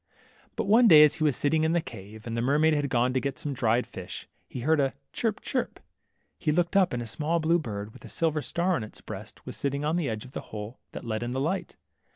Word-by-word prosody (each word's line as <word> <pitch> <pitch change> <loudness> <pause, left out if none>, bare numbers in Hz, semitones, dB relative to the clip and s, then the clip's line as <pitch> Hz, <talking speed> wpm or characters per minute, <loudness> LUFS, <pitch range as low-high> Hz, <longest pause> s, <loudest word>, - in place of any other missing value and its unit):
But 225 - -1
one 225 +4 +6
day 155 -6 +10
as 150 -1 +5
he 160 - -1
was 150 -4 +3
sitting 155 +4 +2
in 160 +1 +2
the 170 - +3
cave, 110 - -9
and 115 -1 -4
the 115 - 0
mermaid 150 +5 +3
had 145 -2 0
gone 125 0 +2
to 130 - +2
get 135 -1 -3
some 145 - -3
dried 120 -1 +2
fish, 95 -1 -7 0.2
he 125 - -6
heard 155 +4 +3
a 135 -1 +1 0.2
chirp 220 -3 -1
chirp. 255 - -2 0.6
He 155 - +1
looked 175 +4 +1
up, 190 -2 +5
and 120 -1 -2
a - - -7
small, 155 +8 0
blue 165 +2 +3
bird, 105 -6 -5
with - - -15
a - - -10
silver 160 -2 0
star 175 +5 0
on 120 - -2
its 110 - -9
breast, - - -9
was - - -6
sitting 140 +1 -1
on 160 +3 +1
the 165 -7 0
edge 110 0 -4
of 130 - -13
the - - -5
hole 105 +2 -7
that - - -7
let 110 -1 -2
in 120 +1 -3
the 130 - -1
light. 165 +8 -2
145 Hz, 260 wpm, -28 LUFS, 120-160 Hz, 0.6 s, day